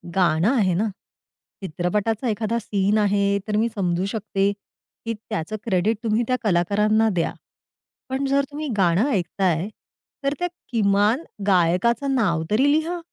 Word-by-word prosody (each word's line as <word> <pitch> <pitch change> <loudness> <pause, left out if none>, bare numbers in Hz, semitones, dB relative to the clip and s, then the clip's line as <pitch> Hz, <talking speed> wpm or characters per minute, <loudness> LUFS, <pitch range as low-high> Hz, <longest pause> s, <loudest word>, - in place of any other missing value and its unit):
गाणं 175 0 +3
आहे 195 -7 +2
ना. 215 +5 0 0.7
चित्रपटाचा 200 - -1
एखादा 220 +2 -1
सीन 205 -1 0
आहे 205 -1 +2 0.2
तर 210 - -1
मी 225 +2 +2
समजू 180 -2 0
शकते 200 -1 -1 0.5
की 230 - -1 0.2
त्याचं 165 +6 -3
क्रेडिट 210 +1 +1
तुम्ही 225 +1 +1
त्या 255 - +2
कलाकारांना 210 +3 +2
द्या. 170 - 0 0.8
पण 265 +1 -1
जर 275 +1 +2
तुम्ही 300 +1 -4
गाणं 190 +7 +3
ऐकताय 180 -3 0 0.6
तर 275 +1 +1
त्या 355 - 0 0.2
किमान 210 +4 +2 0.2
गायकाचं 195 +9 +2
नाव 175 -10 +1
तरी 265 +7 +4
लिहा. 320 +4 0
210 Hz, 135 wpm, -23 LUFS, 185-230 Hz, 0.8 s, तरी